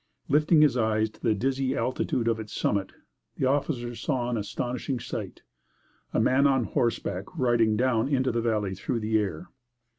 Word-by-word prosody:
Lifting 150 +2 +4
his 145 -4 +4
eyes 110 -1 +1
to - - -22
the 110 -3 +2
dizzy 135 +4 0
altitude 125 -2 -1
of 115 -1 +1
its 110 -1 -8
summit, 100 -2 0 0.5
the - - 0
officer 130 -3 0
saw 125 -1 -2
an 120 - 0
astonishing 120 +5 -3
sight - - -6 0.7
a - - +1
man 140 +2 +4
on 135 -2 +2
horseback 110 -5 -1
riding 115 -4 +2
down 125 -1 +2
into 130 -2 +1
the 115 - 0
valley 105 -4 0
through 115 +6 -3
the 110 0 +2
air! 95 -7 -4
120 Hz, 170 wpm, -27 LUFS, 110-130 Hz, 0.7 s, Lifting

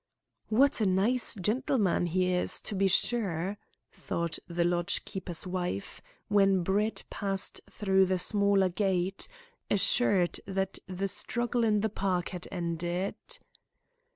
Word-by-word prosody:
"What 265 +3 +3
a 210 - +3
nice 215 +7 +2
gentleman 210 -2 +1
he 180 +1 +1
is, 180 - +2
to - - -3
be 195 0 +2
sure," 195 -2 +1 0.3
thought 170 -1 -3
the 170 0 0
lodge 175 +2 +1
keeper's 185 -4 -5
wife, 180 - -4 0.3
when 195 -3 +3
Brett 205 +5 0
passed 195 -2 -3
through 190 -2 +2
the 185 0 +1
smaller 200 0 +3
gate, 190 0 0 0.4
assured 195 -3 +3
that 195 -1 -2
the 190 +1 -2
struggle 240 +4 -1
in 210 -2 +2
the 220 - 0
park 190 -4 -1
had 180 -2 -6
ended. 175 +1 -2
190 Hz, 125 wpm, -29 LUFS, 180-205 Hz, 0.4 s, What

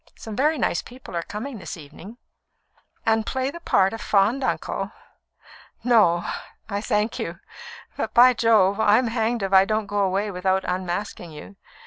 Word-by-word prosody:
Some 220 -2 -8
very 300 +5 +2
nice 175 - 0
people 250 -7 -11
are 170 - 0
coming 220 +7 -6
this 185 - -7
evening." 165 +9 -12 0.9
"And 225 0 +2
play 260 +3 -2
the 340 - -9
part 195 - +2
of 225 - -6
fond 210 +7 +2
uncle? - - -2 0.9
No, 210 -8 +4 0.4
I 200 -1 -3
thank 215 0 -1
you. 170 0 -5 0.6
But, - - -2
by 250 +1 +8
Jove! 220 -4 +3
I'm 220 +3 +4
hanged 225 -1 -1
if 195 0 -2
I 190 0 +8
don't 215 +1 -1
go 205 0 -2
away 200 +1 0
without 190 +1 0
unmasking 180 0 -3
you. 150 +6 -11
210 Hz, 160 wpm, -24 LUFS, 190-230 Hz, 0.9 s, by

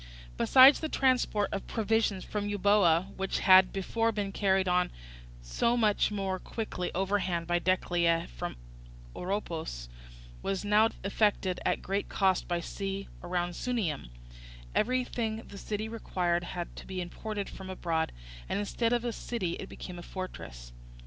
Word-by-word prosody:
Besides, 265 - +7
the 315 - -3
transport 255 -7 +2
of 195 - -4
provisions 220 -3 +1
from 205 -1 -3
Euboea, 200 -3 +3
which 195 0 -1
had 185 -1 +7
before 225 +4 0
been 205 -2 -2
carried 190 -1 +2
on 180 0 +2 0.5
so 145 - +1
much 215 -3 +3
more 195 -2 -2
quickly 210 -5 -4
overland 185 -3 0
by 175 +1 +1
Decelea 170 -2 +1
from - - -4 0.6
Oropus, 165 - -4 0.5
was 195 +1 -2
now 210 +2 +5
effected 200 -2 +1
at - - 0
great 195 +2 -2
cost 190 -2 +2
by 175 -1 0
sea 195 +2 -4
round 175 0 -2
Sunium; 185 - -2 0.6
everything 230 -2 0
the 200 - -10
city 215 +2 -3
required 180 -6 -1
had 175 -1 -5
to - - -9
be 190 -1 -4
imported 200 +3 -4
from 190 -1 -9
abroad, 165 -3 -1 0.4
and - - 0
instead 230 +3 0
of 240 0 0
a 235 - -1
city 220 -9 -3
it 195 - -7
became 180 -1 -8
a - - -7
fortress. - - -7
195 Hz, 145 wpm, -30 LUFS, 180-215 Hz, 0.6 s, Besides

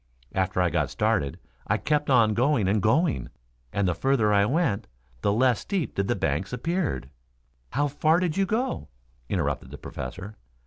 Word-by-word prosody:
After 95 -1 +1
I 90 - +1
got - - +1
started 70 -1 0 0.3
I - - +2
kept 150 -1 0
on 115 -5 +5
going 120 -3 +2
and 100 +2 +2
going, 140 - +2 0.4
and 100 -2 +1
the 90 - +2
further 115 -2 +2
I 100 0 +4
went 135 - 0 0.3
the 100 - +2
less 120 +1 +3
steep 185 - -2
did 100 0 -1
the - - +1
banks 80 +8 -1
appeared 145 - -2 0.3
" - - -41
"How 145 +4 +2
far 155 +4 +2
did 175 -4 0
you 195 0 +1
go?" 245 +6 -1 0.4
interrupted - - -1
the - - -8
Professor. 90 - -7
115 Hz, 175 wpm, -26 LUFS, 95-150 Hz, 0.4 s, on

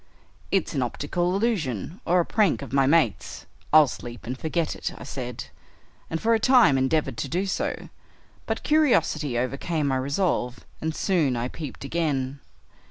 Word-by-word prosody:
'It's 195 -3 0
an 140 - 0
optical 175 +9 -1
illusion, 180 - -1
or 180 +2 +3
a 170 - +2
prank 210 -9 +2
of 135 - -9
my 135 -1 +4
mates; 130 - +1 0.3
I'll 155 0 +8
sleep 120 -1 -8
and 125 +3 -3
forget 160 +3 -2
it,' - - -4
I - - -9
said, 125 -3 -6 0.6
and 165 - -2
for 230 +5 +2
a 225 - +3
time 240 - +5
endeavored 130 -1 +1
to 115 - -2
do 180 +7 -1
so, 190 - -3 0.6
but - - -2
curiosity 160 - +2
overcame 140 +5 -1
my 130 - +1
resolve, 140 -2 -1 0.2
and 160 0 -2
soon 160 -10 +1
I 120 +2 -2
peeped 150 -4 -8
again. 140 -4 -1
150 Hz, 165 wpm, -25 LUFS, 130-175 Hz, 0.6 s, I'll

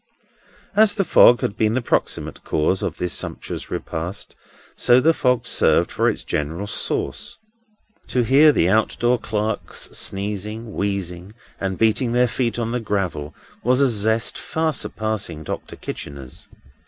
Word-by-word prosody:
As 215 0 +5
the 195 - +1
fog 120 -6 +6
had 100 - -1
been 110 +1 +1
the 130 - +1
proximate - - -1
cause 80 +5 0
of - - -3
this 90 -1 -2
sumptuous - - -4
repast, 85 +5 -5 0.4
so 125 +1 +5
the 160 +5 +4
fog 125 -5 +1
served - - +2
for - - +2
its - - -4
general 80 +7 -3
sauce. 105 - -2 0.7
To 125 - +1
hear 140 +6 +6
the 85 - +2
out 110 +3 +2
door 120 +1 +2
clerks 105 0 -3
sneezing, 105 +3 -3
wheezing, 100 -1 -3 0.2
and 95 -1 -2
beating 115 +2 +2
their 125 0 +4
feet 120 0 -1
on 115 -1 -2
the 125 - -1
gravel 95 -9 -3 0.3
was 125 +2 +3
a 140 -1 +4
zest 110 +1 +1
far 160 -1 -1
surpassing 110 - -3
Doctor - - -6
Kitchener's. 70 -3 -8
110 Hz, 150 wpm, -22 LUFS, 95-125 Hz, 0.7 s, fog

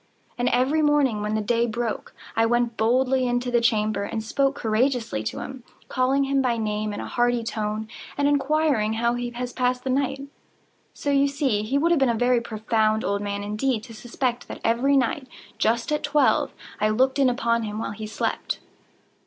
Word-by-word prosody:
And 245 0 +1
every 265 +6 +2
morning, 290 -7 +2
when 210 +1 -1
the 215 - 0
day 235 +2 +1
broke, 230 -1 -3 0.2
I 225 0 +3
went 240 0 +1
boldly 255 +4 +2
into 245 0 -1
the 240 -1 +3
chamber, 215 -3 +1
and 220 +2 -3
spoke 275 +5 +1
courageously 230 - 0
to - - -3
him, 265 -2 -8 0.3
calling 265 +2 +2
him 275 0 +1
by 245 -3 +1
name 215 -1 -2
in 205 - -5
a - - -4
hearty 240 -1 +1
tone, 215 -1 -3 0.3
and 285 0 +2
inquiring 285 -6 +2
how 235 +1 +1
he 245 0 -3
has 245 +1 -5
passed 250 0 0
the 265 - -1
night. 270 +1 0 0.7
So 285 - -2
you 280 0 +4
see 275 -7 0
he 230 +6 0
would 330 +4 +2
have 335 - +4
been 270 -2 +3
a 235 - +1
very 245 +1 +2
profound 220 -1 0
old 200 0 0
man, 200 0 -3
indeed, 215 +3 -1
to 235 - -11
suspect 240 +2 -3
that - - -7
every 255 +5 +3
night, 260 +1 0 0.3
just 230 +5 +1
at 300 - +1
twelve, 290 -2 +2 0.3
I 215 +1 +2
looked 260 +5 +2
in 270 -2 +5
upon 235 -1 +1
him 210 -1 -4
while 225 - -3
he 215 +1 -6
slept. 215 - -2
240 Hz, 195 wpm, -24 LUFS, 220-265 Hz, 0.7 s, in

